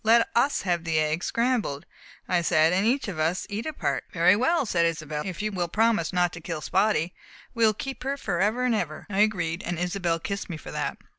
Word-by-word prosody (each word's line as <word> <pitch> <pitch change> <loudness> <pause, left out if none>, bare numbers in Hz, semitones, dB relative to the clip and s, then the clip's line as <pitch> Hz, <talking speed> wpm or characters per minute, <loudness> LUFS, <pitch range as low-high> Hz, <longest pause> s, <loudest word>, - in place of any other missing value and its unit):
"Let 230 +1 +5
us 270 +5 +2
have 175 -3 0
the 165 -2 0
egg 155 +2 0
scrambled," 235 - 0 0.4
I 180 -1 +2
said, 165 -1 +3
"and 195 +4 +2
each 265 +1 +1
of 180 -6 -5
us 165 +4 0
eat 215 +7 -3
a - - -1
part." - - -2
"Very 180 +2 +5
well," 275 +7 +2
said 175 -6 +1
Isobel, 155 -3 -1
"if 185 +2 -5
you 215 - -1
will 180 -3 -1
promise 220 -1 +1
not 180 -2 +1
to 165 - -8
kill 160 -1 -5
Spotty. 185 -3 +1 0.4
We 230 -2 +3
will 215 - +2
keep 270 +4 -6
her 275 +2 -2
forever 210 +2 0
and 250 - +2
forever!" 165 -8 -3
I 195 - -1
agreed. 180 -5 +1
Isobel 175 0 -1
kissed 200 +5 -5
me 165 - -4
for - - -10
that. - - -3
185 Hz, 220 wpm, -26 LUFS, 165-220 Hz, 0.4 s, Let